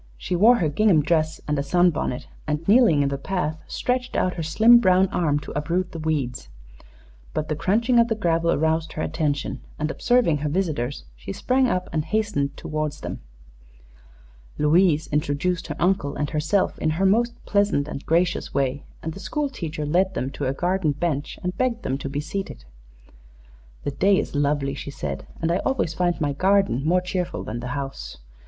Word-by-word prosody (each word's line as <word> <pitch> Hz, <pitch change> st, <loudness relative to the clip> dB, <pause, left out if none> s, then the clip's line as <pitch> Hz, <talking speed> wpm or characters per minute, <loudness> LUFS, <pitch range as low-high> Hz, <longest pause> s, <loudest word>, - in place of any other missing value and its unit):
She 180 Hz, -, -3 dB
wore 220 Hz, +7 st, +6 dB
her 175 Hz, -9 st, +1 dB
gingham 165 Hz, 0 st, +3 dB
dress 155 Hz, 0 st, +1 dB
and 150 Hz, -1 st, 0 dB
a -, -, +2 dB
sunbonnet, 165 Hz, -3 st, +1 dB, 0.2 s
and, 150 Hz, +2 st, -2 dB
kneeling 205 Hz, -, +5 dB
in 140 Hz, -, +1 dB
the 140 Hz, 0 st, -3 dB
path, 160 Hz, -2 st, -2 dB
stretched 250 Hz, 0 st, -2 dB
out 185 Hz, -, +1 dB
her 170 Hz, -, -5 dB
slim 220 Hz, +10 st, +6 dB
brown 185 Hz, -3 st, +4 dB
arm 160 Hz, -7 st, +1 dB
to -, -, -8 dB
uproot 170 Hz, +5 st, -1 dB
the 165 Hz, -, -6 dB
weeds. 140 Hz, -, -2 dB, 0.9 s
But 155 Hz, -, -2 dB
the 155 Hz, -, 0 dB
crunching 225 Hz, -, +2 dB
of 235 Hz, -, +5 dB
the 225 Hz, -, 0 dB
gravel 170 Hz, -4 st, +1 dB
aroused 160 Hz, +1 st, 0 dB
her 155 Hz, -, -3 dB
attention, 150 Hz, -3 st, -2 dB, 0.2 s
and, 155 Hz, +1 st, -1 dB
observing 240 Hz, -10 st, +2 dB
her 150 Hz, +1 st, -2 dB
visitors, 145 Hz, -7 st, -2 dB
she -, -, -8 dB
sprang 255 Hz, -, +1 dB
up 180 Hz, -5 st, -1 dB
and 155 Hz, -2 st, 0 dB
hastened 155 Hz, -9 st, -1 dB
toward 155 Hz, -1 st, -3 dB
them. -, -, -7 dB, 1.4 s
Louise 160 Hz, +1 st, +3 dB
introduced 150 Hz, +4 st, -1 dB
her 150 Hz, -, -4 dB
uncle 175 Hz, -6 st, +1 dB
and 145 Hz, 0 st, -2 dB
herself 155 Hz, +6 st, 0 dB
in 155 Hz, -, +1 dB
her 195 Hz, -, +2 dB
most 235 Hz, +5 st, +2 dB
pleasant 200 Hz, -8 st, +1 dB
and 145 Hz, -2 st, -6 dB
gracious 170 Hz, -1 st, 0 dB
way, 140 Hz, 0 st, 0 dB, 0.2 s
and 160 Hz, -, -3 dB
the 195 Hz, -, -9 dB
school 290 Hz, -, -2 dB
teacher 155 Hz, -, -5 dB
led 185 Hz, +6 st, +1 dB
them 130 Hz, +2 st, -2 dB
to 140 Hz, -1 st, -3 dB
a -, -, +1 dB
garden 175 Hz, 0 st, 0 dB
bench 145 Hz, -1 st, -2 dB
and 180 Hz, 0 st, -2 dB
begged 245 Hz, -2 st, 0 dB
them 135 Hz, +1 st, -2 dB
to 140 Hz, -, -5 dB
be 140 Hz, +1 st, -3 dB
seated. 155 Hz, -, -5 dB, 1.2 s
"The 145 Hz, -, -2 dB
day 195 Hz, +7 st, +3 dB
is -, -, -2 dB
lovely," 145 Hz, -1 st, 0 dB
she 140 Hz, -, -6 dB
said, 70 Hz, -, -5 dB
"and 165 Hz, 0 st, 0 dB
I 175 Hz, -, +2 dB
always 265 Hz, -11 st, -1 dB
find 175 Hz, 0 st, 0 dB
my 145 Hz, -3 st, 0 dB
garden 190 Hz, -4 st, +2 dB
more 175 Hz, +4 st, +3 dB
cheerful 180 Hz, -1 st, -3 dB
than 110 Hz, +2 st, -5 dB
the 125 Hz, -, -5 dB
house. 135 Hz, -, -6 dB
160 Hz, 190 wpm, -24 LUFS, 145-190 Hz, 1.4 s, wore